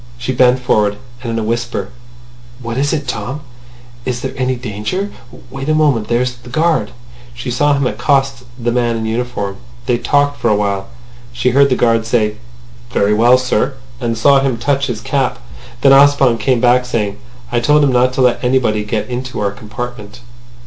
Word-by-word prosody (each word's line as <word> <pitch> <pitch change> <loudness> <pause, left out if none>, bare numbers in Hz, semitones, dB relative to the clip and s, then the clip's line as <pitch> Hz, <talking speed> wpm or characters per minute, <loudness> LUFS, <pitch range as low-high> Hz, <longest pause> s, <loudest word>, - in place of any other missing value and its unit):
She 125 +2 -3
bent 125 0 +4
forward, 105 -5 +1 0.2
and 120 -2 -4
in - - -2
a 110 - -1
whisper: 115 -3 -2 0.7
"What 115 -2 -5
is 140 +3 0
it, 145 -3 -2
Tom? 125 +5 -4 0.6
Is 120 -1 -3
there 130 - -4
any 130 0 0
danger? 125 - -4 0.4
Wait 135 +2 -5
a 155 - +3
moment. 140 -9 +2
There's 125 +1 0
the 120 +1 -14
guard." 155 -6 +1 0.5
She 125 +1 -5
saw 145 +4 +2
him 140 -1 0
accost 135 -1 0
the 120 -1 -1
man 120 -1 +1
in 110 - -3
uniform. 110 -4 -3 0.3
They 120 -2 +1
talked 145 0 +1
for 120 - +1
a 105 - +3
while. 100 0 -1 0.4
She 125 +1 0
heard 140 +2 +4
the 130 - +2
guard 115 -2 +2
say 110 -3 +1 0.5
"Very 100 +1 +1
well, 120 +4 +5
sir," 130 +1 0 0.2
and 115 -2 -2
saw 140 +4 +5
him 135 -3 0
touch 140 +2 0
his 115 -4 -4
cap. 135 +1 -1 0.4
Then 135 - +5
Ossipon 135 -4 +5
came 125 +2 +1
back, 125 +1 +4
saying: 105 -4 -2 0.3
"I 120 - +2
told 150 +5 +3
him 140 - +3
not 125 +1 +3
to 135 - 0
let 125 -1 +2
anybody 125 -4 +1
get 105 0 -2
into 125 +1 -5
our 100 -1 0
compartment." 120 +1 -8
125 Hz, 185 wpm, -16 LUFS, 115-135 Hz, 0.7 s, well